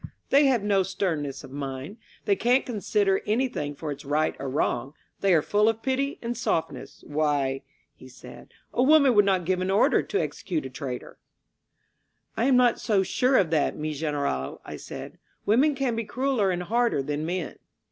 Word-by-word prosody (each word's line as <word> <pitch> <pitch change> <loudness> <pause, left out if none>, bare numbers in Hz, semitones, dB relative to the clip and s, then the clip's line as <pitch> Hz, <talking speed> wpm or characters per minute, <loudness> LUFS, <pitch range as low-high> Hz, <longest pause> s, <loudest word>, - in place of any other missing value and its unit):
They 280 +1 +6
have 245 -6 +2
no 200 -2 +3
stern 185 -4 -1
ness 140 -1 -6
of 135 - -11
mind. 140 - -6 0.3
They 200 - +3
can't 245 +6 +2
consider 205 -4 0
anything 210 - -1
for 150 +1 -5
its 140 - -7
right 150 +2 0
or 140 - -4
wrong. 135 0 -1 0.2
They 195 - +2
are 160 -4 +4
full 210 +1 +3
of 225 0 -3
pity 270 +2 -1
and 235 +1 -2
softness. 165 -7 -3
Why," 145 -3 0 0.3
he 130 - -15
said, 125 -1 -13 0.2
a - - +1
woman 280 -1 +6
would 205 -2 +5
not 190 -3 +1
give 185 +1 0
an 185 - -1
order 195 +2 +4
to 410 - -2
execute 165 - -3
a 130 - -7
traitor." 125 -1 -7 1.2
"I 230 - 0
am 265 -1 +4
not 245 -1 +4
so 210 -3 +2
sure 255 +7 +2
of 170 -5 +2
that, 155 -3 +1
mi 155 0 -3
General^ 140 - -2
I - - -7
said. - - -9 0.3
Women 270 +8 +3
can 265 -4 -1
be 230 - -2
crueller 240 -1 0
and 180 -1 -1
harder 230 - +1
than 145 +2 -3
men." 170 -1 -4
190 Hz, 190 wpm, -26 LUFS, 145-235 Hz, 1.2 s, They